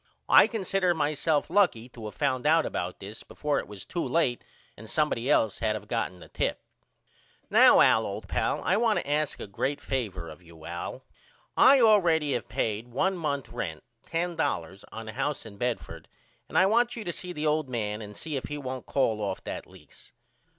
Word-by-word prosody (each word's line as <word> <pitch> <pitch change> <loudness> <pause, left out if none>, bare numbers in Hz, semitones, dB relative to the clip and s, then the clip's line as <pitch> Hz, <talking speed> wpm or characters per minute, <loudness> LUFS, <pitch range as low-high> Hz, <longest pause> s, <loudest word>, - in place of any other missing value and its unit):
I - - +8
consider 195 -4 0
myself 150 0 +1
lucky 175 - +3
to 115 -3 -8
of 105 - -9
found 135 -2 0
out 160 +1 +4
about 90 0 -4
this 100 +3 -9
before 150 -1 -2
it - - -6
was 100 -2 -10
too 175 - -3
late 135 -8 +1 0.3
and 110 +1 -11
somebody 145 -5 0
else 110 -8 +2
had 110 -1 0
of 105 -1 -7
gotten 105 -6 -2
the - - -11
tip. - - -2 0.9
Now - - +7
Al - - +5
old - - -6
pal - - -1
I 190 - +2
want 225 -1 +2
to - - -3
ask 150 +1 0
a - - -5
great 135 +8 -2
favor 105 -11 -3
of 80 +2 -11
you 85 -2 -15
Al. 85 0 -6 0.5
I 275 0 +7
all 215 -3 +6
ready 160 -4 +2
have 120 - -3
payed 110 +2 -2
one 190 +11 0
month 145 -6 -3
rent 80 -5 -5 0.2
$10 160 - -2
on 115 0 -7
the 110 - -7
house 145 -4 -2
in 105 -2 -11
Bedford 120 +2 -4 0.4
and - - -2
I 185 - +6
want 235 +4 +2
you 230 - -5
to 175 - -3
see 180 - -6
the 155 -3 -4
old 150 -2 +1
man 105 -3 -2
and 105 -1 -9
see 155 -2 -5
if 135 - -3
he 150 - -5
won't 130 -2 -6
call 115 -6 +1
off 100 -2 -3
that - - -6
lease. - - -17
135 Hz, 200 wpm, -28 LUFS, 105-165 Hz, 0.9 s, I